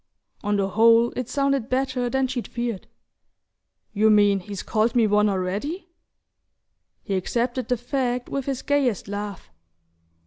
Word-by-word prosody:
On 205 0 0
the 195 -1 0
whole 230 +3 +5
it 250 -1 -4
sounded 275 -3 0
better 255 -1 0
than 265 +1 +1
she'd 250 -2 -4
feared. 235 -5 -4 1.1
"You 220 +1 +3
mean 205 -2 +4
he's 200 0 -7
called 220 +2 0
me 235 -2 +4
one 210 0 +3
already?" 205 - -3 1.1
He 200 - -3
accepted 240 +6 -1
the 250 - +1
fact 250 0 -2
with 275 -2 -3
his 270 -2 -3
gayest 270 -9 0
laugh. 205 - -6
235 Hz, 140 wpm, -24 LUFS, 205-255 Hz, 1.1 s, whole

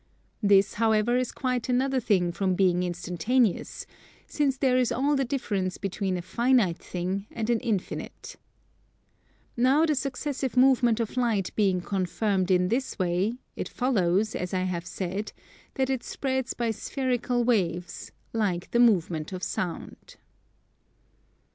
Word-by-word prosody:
This, 200 -1 +4
however, 220 +1 +3
is 255 -1 0
quite 250 -2 -2
another 260 +1 +2
thing 185 -7 +1
from 185 +1 0
being 180 -2 +3
instantaneous, 180 +6 0 0.4
since 280 -3 0
there 260 -1 +2
is 255 -2 +2
all 285 +4 +1
the 270 - +1
difference 205 -9 -2
between 195 -1 -2
a 175 - -5
finite 230 -2 +2
thing 185 +3 -4
and 230 0 -2
an 235 - +2
infinite. 220 -7 -4 1.2
Now 265 +6 +4
the 310 - +2
successive 275 -1 -3
movement 250 -3 +4
of 230 +2 -3
Light 225 -7 0
being 190 -4 +2
confirmed 190 +1 -1
in 180 -1 +3
this 255 +4 -1
way, 185 +4 0 0.2
it - - -4
follows, 215 -4 +1
as 180 +1 -3
I 185 - 0
have 175 -2 -3
said, 195 +3 -4 0.4
that 265 -1 0
it 260 -3 -2
spreads 260 -2 -2
by 235 -1 0
spherical 245 +1 -1
waves, 180 -7 -1 0.2
like 195 -6 -1
the 235 - +2
movement 175 -9 +2
of 185 -1 -6
Sound. 175 -3 -5
215 Hz, 140 wpm, -27 LUFS, 185-250 Hz, 1.2 s, This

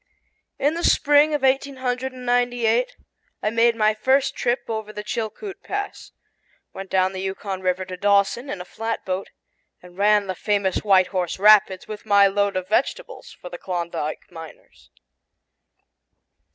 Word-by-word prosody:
In 290 +3 +1
the 340 +1 -4
spring 295 +1 +4
of 290 - -3
1898 255 - 0 0.5
I 215 - +2
made 230 +1 +3
my 215 -1 +2
first 260 +5 +1
trip 245 +1 0
over 220 -2 -4
the 210 0 -7
Chilkoot 380 - -5
Pass, 405 -1 -5 0.6
went 195 0 -8
down 190 0 +1
the 190 - -5
Yukon 190 0 -4
river 185 0 -1
to 185 0 -7
Dawson 200 +7 +1
in 195 - -4
a - - -8
flatboat, 200 -3 -4 0.5
and 180 +1 -16
ran 210 0 +4
the 190 - -3
famous 200 0 0
White 190 -3 +3
Horse 180 -3 -2
Rapids 200 -2 +5
with 215 0 -9
my 200 -1 +6
load 200 0 +1
of 185 0 -4
vegetables 275 - -2
for 180 - -10
the 175 - -8
Klondike 170 -4 -4
miners. 165 -2 -13
210 Hz, 145 wpm, -22 LUFS, 190-250 Hz, 0.6 s, my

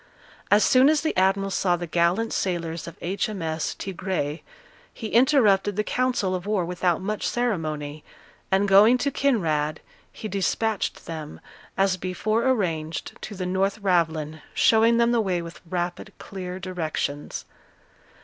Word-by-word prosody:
As 205 +1 +5
soon 260 +2 +5
as 310 -1 +3
the 320 - -1
admiral 195 +1 +2
saw 180 -1 +2
the 175 0 -4
gallant 175 +7 +1
sailors 170 -3 -2
of 170 - -9
H.M.S. 175 -4 -2
Tigre, 180 -5 -3 0.5
he 225 - -6
interrupted 220 -6 +4
the 210 - 0
council 245 -6 0
of 185 +1 -4
war 205 -4 +1
without 175 0 0
much 210 +2 -2
ceremony, 155 -11 -2 0.5
and 195 +1 +3
going 205 +5 +7
to 280 +3 -1
Kinraid, 160 - 0 0.3
he 215 - -7
despatched 210 +1 -1
them, 155 -2 -7 0.4
as 195 -1 +2
before 215 +7 0
arranged, 165 - -2
to 210 - -7
the 185 -1 -4
North 190 +3 0
Ravelin, 160 -4 0
showing 225 +1 +5
them 235 0 +3
the 235 -1 +3
way 185 -4 0
with 170 0 -9
rapid, 180 +3 -3
clear 185 -1 -7
directions. 160 -5 -4
190 Hz, 140 wpm, -25 LUFS, 170-215 Hz, 0.5 s, going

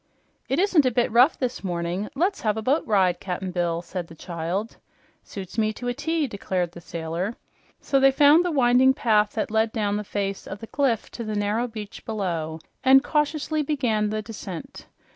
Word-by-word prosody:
"It 270 - +1
isn't 350 -7 +4
a - - +5
bit 240 -1 +1
rough 250 +7 +5
this 255 -4 -3
morning. 175 +2 -2
Let's 365 +7 0
have 215 -1 0
a 220 - -3
boat 275 +7 +2
ride, 185 -4 +3
Cap'n 185 0 -4
Bill," 175 -1 -1
said 175 -1 -5
the 165 - -13
child. 175 +6 -4 0.4
"Suits 195 +2 -7
me 215 -1 +2
to 245 - -6
a - - 0
T," 315 +3 -1
declared 190 -6 -2
the 170 - -11
sailor. 170 +6 -4 0.5
So 275 - +2
they 270 0 +6
found 290 +5 +6
the 355 - 0
winding 260 -1 +4
path 210 -4 +2
that 280 - -2
led 220 0 +2
down 205 -2 -1
the 210 - -3
face 195 -1 -3
of 195 - -6
the 225 - -9
cliff 250 -2 0
to 235 - -6
the 215 -1 -3
narrow 210 +4 0
beach 215 -3 -8
below 170 -7 -3 0.3
and 265 +1 +7
cautiously 300 +1 0
began 245 -8 0
the 215 0 -3
descent. 200 -5 -8
215 Hz, 195 wpm, -24 LUFS, 190-265 Hz, 0.5 s, and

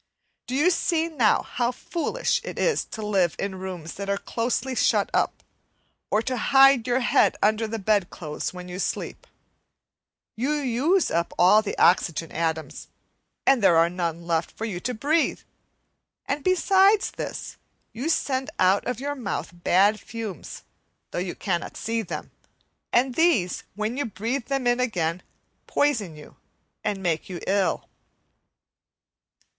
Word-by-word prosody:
Do 255 - -3
you 315 +7 +4
see 330 -1 0
now 250 -10 +2
how 240 0 -1
foolish 345 - -2
it - - -7
is 485 - +1
to 220 -2 -7
live 190 -5 +1
in 190 -1 -4
rooms 180 -4 -6
that 200 0 -6
are 200 - +1
closely 240 +5 -2
shut - - +2
up, - - 0 0.7
or 215 +2 +1
to 255 +1 -2
hide 270 0 +5
your 250 +1 +2
head - - +3
under 215 +2 +2
the 225 +1 -4
bedclothes 190 -7 -1
when 180 0 -9
you 180 +1 -6
sleep? - - -4 1.1
You 260 +7 0
use 295 +6 +1
up 170 +1 0
all 190 +5 +6
the 215 - -5
oxygen 165 -2 +3
atoms, 160 -1 -3 0.6
and 270 - +5
then - - -6
there 175 -4 +5
are 165 +1 +4
none 170 -2 -3
left 165 -1 0
for 225 - -6
you 195 -6 -4
to 245 +6 -3
breathe; 305 +8 +1 0.8
and 285 0 -2
besides 385 +3 +4
this, - - -6 0.4
you 255 +8 -3
send 265 -3 0
out 190 +4 +3
of 250 -2 -2
your 285 +2 -2
mouth 250 -8 -4
bad 190 +5 +3
fumes, 220 -7 -7 0.5
though - - -2
you 180 0 -3
cannot 175 -4 -3
see 230 0 -1
them, 170 -7 -6 0.6
and 250 +1 +2
these, 305 - +2
when 215 +4 -2
you 285 - -1
breathe 230 +4 -3
them 275 -2 -1
in 245 0 +2
again, 180 -8 -1 0.5
poison 225 - 0
you 150 - -14 0.5
and 200 -3 -2
make 165 -1 -1
you 180 -2 -5
ill. 195 -1 0
220 Hz, 150 wpm, -25 LUFS, 180-270 Hz, 1.1 s, all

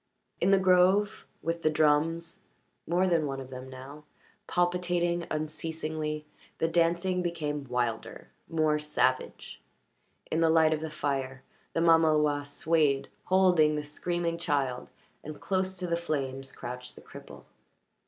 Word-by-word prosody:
In 180 - +2
the 195 - +6
grove, 190 +2 +3 0.2
with 165 0 -2
the 155 - +3
drums 155 +2 +1 0.5
more 175 +2 +2
than 165 -4 +2
one 135 -1 -4
of 130 -1 -9
them 130 0 -8
now 135 +3 -10 0.4
palpitating 175 -1 0
unceasingly, 155 0 -3 0.3
the 165 - +1
dancing 175 +2 +1
became 150 -5 -3
wilder, 120 -2 -3 0.2
more 155 -2 +2
savage. 130 -4 -1 0.7
In 160 - +1
the 165 - +4
light 160 -1 +5
of 155 - -2
the 160 - -4
fire 135 -3 -3 0.3
the 165 - 0
mamaloi 155 -3 +4
swayed, 145 -2 +1 0.2
holding 180 -5 +4
the 150 0 -3
screaming 170 +2 -2
child, 140 -6 -1 0.3
and 155 0 -8
close 190 0 -1
to 180 - -4
the 170 -1 0
flames 135 -5 -3
crouched 125 +1 -7
the - - -13
cripple. - - -12
155 Hz, 135 wpm, -29 LUFS, 145-170 Hz, 0.7 s, the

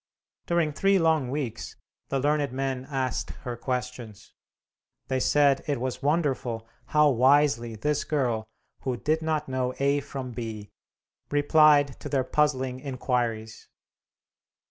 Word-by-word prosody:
During 170 -3 +1
three 195 +6 +3
long 160 -6 +2
weeks 135 -4 -4 0.3
the 135 - 0
learned 145 0 +1
men 130 0 -3
asked 130 -4 -2 0.2
her 120 -1 -3
questions. 125 -3 -5 0.8
They 130 -1 +1
said 140 0 +3
it 145 -4 0
was 130 +1 -3
wonderful 135 -7 -1 0.2
how 150 -1 +4
wisely 130 -2 +3
this 150 +7 -1
girl, 120 -7 -1 0.3
who 130 -2 -3
"did 155 +5 0
not 155 -1 -1
know 130 -1 -2
A 140 +1 +2
from 135 -2 -6
B," 110 -3 -6 0.6
replied 145 -1 +4
to - - -7
their 135 -2 +1
puzzling 130 -2 0
inquiries. 120 -5 -3
135 Hz, 125 wpm, -27 LUFS, 125-150 Hz, 0.8 s, how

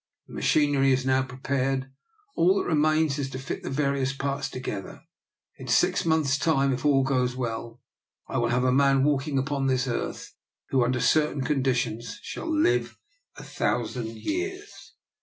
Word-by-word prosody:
The - - -14
machinery 145 -3 +2
is 130 0 0
now 130 0 +3
prepared; 135 +1 -2 0.4
all 180 +3 +4
that - - -1
remains 155 -2 +2
is 135 -1 -2
to 130 - -6
fit 135 +1 -5
the - - -5
various 140 -1 0
parts 140 0 -3
together. 105 -6 -6 0.6
In - - -8
six - - +2
months* 150 -4 +2
time, 140 -4 +2
if 130 - -4
all 140 -2 +4
goes 125 -2 0
well, 115 -1 -4 0.5
I - - -2
will 120 - +1
have 125 +1 +1
a 130 - +3
man 135 0 +4
walking 145 0 +1
upon 135 0 -1
this 130 -1 +1
earth 120 - -4 0.4
who, 130 -2 +3
under 125 +1 0
certain 145 +3 +2
conditions, 130 - -1
shall 335 - -6
live 315 +3 +1 0.4
a - - -9
thousand 120 0 -2
years.' 375 - -5
135 Hz, 160 wpm, -26 LUFS, 130-150 Hz, 0.6 s, all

